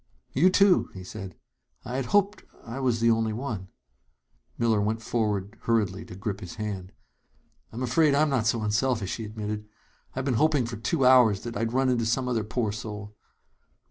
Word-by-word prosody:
"You, 170 Hz, +8 st, +5 dB
too!" 195 Hz, 0 st, +4 dB
he 95 Hz, -, -7 dB
said. 95 Hz, -1 st, -8 dB, 0.5 s
"I 125 Hz, -, -4 dB
had 135 Hz, -, -1 dB
hoped 200 Hz, -, +2 dB, 0.2 s
I 115 Hz, +4 st, -6 dB
was 125 Hz, -4 st, +1 dB
the 115 Hz, 0 st, +5 dB
only 110 Hz, -1 st, +1 dB
one 110 Hz, -6 st, -4 dB, 0.5 s
" -, -, -43 dB
Miller 115 Hz, -3 st, +2 dB
went 110 Hz, +2 st, -1 dB
forward 105 Hz, -3 st, -1 dB
hurriedly 105 Hz, -3 st, 0 dB
to -, -, -10 dB
grip 100 Hz, 0 st, -4 dB
his 90 Hz, -5 st, -8 dB
hand. 100 Hz, -3 st, -5 dB, 0.8 s
"I'm 120 Hz, +3 st, -5 dB
afraid 140 Hz, +4 st, +3 dB
I'm 150 Hz, +1 st, +3 dB
not 120 Hz, -5 st, +1 dB
so 115 Hz, -1 st, +1 dB
unselfish," 110 Hz, -1 st, 0 dB
he 110 Hz, -, -5 dB
admitted. 105 Hz, 0 st, -5 dB, 0.5 s
"I've 130 Hz, 0 st, -2 dB
been 135 Hz, -, +1 dB
hoping 150 Hz, -5 st, +3 dB
for 115 Hz, -1 st, -5 dB
two 135 Hz, +5 st, 0 dB
hours 125 Hz, -6 st, +6 dB
that 120 Hz, -1 st, -6 dB
I'd 115 Hz, +2 st, -1 dB
run 130 Hz, +1 st, +2 dB
into 120 Hz, -3 st, +1 dB
some 125 Hz, +3 st, 0 dB
other 115 Hz, -3 st, 0 dB
poor 110 Hz, 0 st, -1 dB
soul." 105 Hz, -1 st, -7 dB
115 Hz, 185 wpm, -27 LUFS, 105-130 Hz, 0.8 s, hours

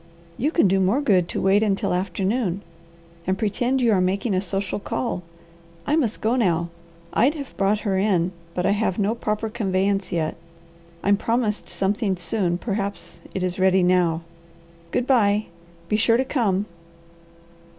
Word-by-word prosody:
You 280 Hz, -, 0 dB
can 325 Hz, -, +3 dB
do 190 Hz, +1 st, +2 dB
more 190 Hz, +8 st, +2 dB
good 190 Hz, -11 st, +2 dB
to -, -, -2 dB
wait 195 Hz, +2 st, +3 dB
until 200 Hz, -2 st, +1 dB
afternoon, 195 Hz, +2 st, -1 dB, 0.6 s
and 190 Hz, 0 st, +1 dB
pretend 245 Hz, +4 st, 0 dB
you 235 Hz, -, +4 dB
are 190 Hz, -3 st, +3 dB
making 195 Hz, +4 st, 0 dB
a 185 Hz, -, +1 dB
social 195 Hz, +1 st, -2 dB
call. 215 Hz, -2 st, -3 dB, 0.6 s
I 295 Hz, -, +2 dB
must 250 Hz, -9 st, 0 dB
go 225 Hz, +3 st, +2 dB
now. 170 Hz, -8 st, +1 dB, 0.4 s
I'd 270 Hz, +8 st, +3 dB
have 280 Hz, -3 st, -7 dB
brought 200 Hz, +2 st, +1 dB
her 195 Hz, -3 st, 0 dB
in, 185 Hz, -3 st, +2 dB, 0.2 s
but 180 Hz, -, -1 dB
I -, -, +3 dB
have 205 Hz, -2 st, 0 dB
no 205 Hz, +1 st, +1 dB
proper 220 Hz, -1 st, -2 dB
conveyance 195 Hz, -2 st, 0 dB
yet. 165 Hz, -3 st, -1 dB, 0.7 s
I'm 200 Hz, 0 st, +4 dB
promised 225 Hz, -1 st, -1 dB
something 200 Hz, 0 st, 0 dB
soon, 175 Hz, 0 st, 0 dB
perhaps 200 Hz, -4 st, -4 dB, 0.2 s
it 190 Hz, -, -1 dB
is 185 Hz, 0 st, -2 dB
ready 190 Hz, 0 st, +4 dB
now. 175 Hz, -2 st, +2 dB, 0.7 s
Good 245 Hz, -, 0 dB
bye! 215 Hz, -5 st, +3 dB, 0.4 s
Be 210 Hz, -, +1 dB
sure 230 Hz, +1 st, +4 dB
to 260 Hz, -, +1 dB
come!" 210 Hz, -8 st, 0 dB
200 Hz, 160 wpm, -23 LUFS, 185-225 Hz, 0.7 s, you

